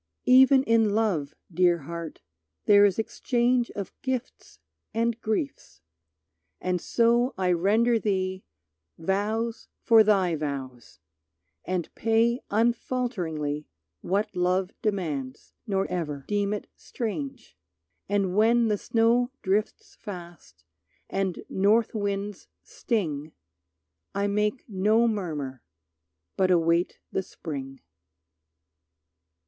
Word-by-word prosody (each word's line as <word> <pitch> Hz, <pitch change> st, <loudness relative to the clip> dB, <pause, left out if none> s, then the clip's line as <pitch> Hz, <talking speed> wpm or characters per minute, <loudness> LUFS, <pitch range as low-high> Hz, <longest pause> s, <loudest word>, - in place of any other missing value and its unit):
Even 265 Hz, +1 st, +7 dB
in 225 Hz, -4 st, +3 dB
love, 170 Hz, -10 st, 0 dB, 0.2 s
Dear 175 Hz, -1 st, +3 dB
Heart, 170 Hz, +1 st, -7 dB, 0.4 s
there 205 Hz, 0 st, +7 dB
is 195 Hz, -3 st, +2 dB
exchange 240 Hz, +2 st, +1 dB
Of 200 Hz, -2 st, -5 dB
gifts 260 Hz, -2 st, -4 dB, 0.4 s
and 230 Hz, 0 st, 0 dB
griefs, 220 Hz, -, -3 dB, 0.8 s
and 180 Hz, -1 st, -1 dB
so 235 Hz, +2 st, +2 dB
I 185 Hz, -1 st, +1 dB
render 220 Hz, +7 st, +3 dB
thee 190 Hz, -3 st, -1 dB, 0.5 s
Vows 210 Hz, +6 st, -1 dB, 0.2 s
for 225 Hz, -2 st, +7 dB
thy 195 Hz, -5 st, +3 dB
vows, 135 Hz, -5 st, -6 dB, 0.7 s
and 180 Hz, -2 st, -3 dB
pay 230 Hz, +2 st, +2 dB
unfalteringly 205 Hz, -, -1 dB, 0.3 s
What 200 Hz, +4 st, -1 dB
love 180 Hz, +1 st, +1 dB
demands, 155 Hz, -, -3 dB
nor 195 Hz, -2 st, +1 dB
ever 150 Hz, -6 st, -4 dB
deem 205 Hz, -1 st, 0 dB
it 210 Hz, -, -3 dB
strange. 255 Hz, +2 st, -5 dB, 0.5 s
And 195 Hz, -2 st, 0 dB
when 230 Hz, +2 st, +4 dB
the 210 Hz, -1 st, 0 dB
snow 235 Hz, +1 st, +2 dB
drifts 205 Hz, +2 st, -1 dB
fast, 175 Hz, -, -10 dB, 0.5 s
and 190 Hz, -2 st, -2 dB
north 210 Hz, +4 st, +2 dB
winds 205 Hz, -1 st, -3 dB, 0.2 s
sting 155 Hz, -, -3 dB, 0.8 s
I 200 Hz, 0 st, +1 dB
make 210 Hz, +4 st, -1 dB
no 215 Hz, +3 st, +3 dB
murmur, 150 Hz, -, -3 dB, 0.8 s
but 190 Hz, -1 st, +3 dB
await 170 Hz, 0 st, +2 dB
the -, -, 0 dB
Spring. 135 Hz, -7 st, -7 dB
200 Hz, 100 wpm, -26 LUFS, 175-230 Hz, 0.8 s, Even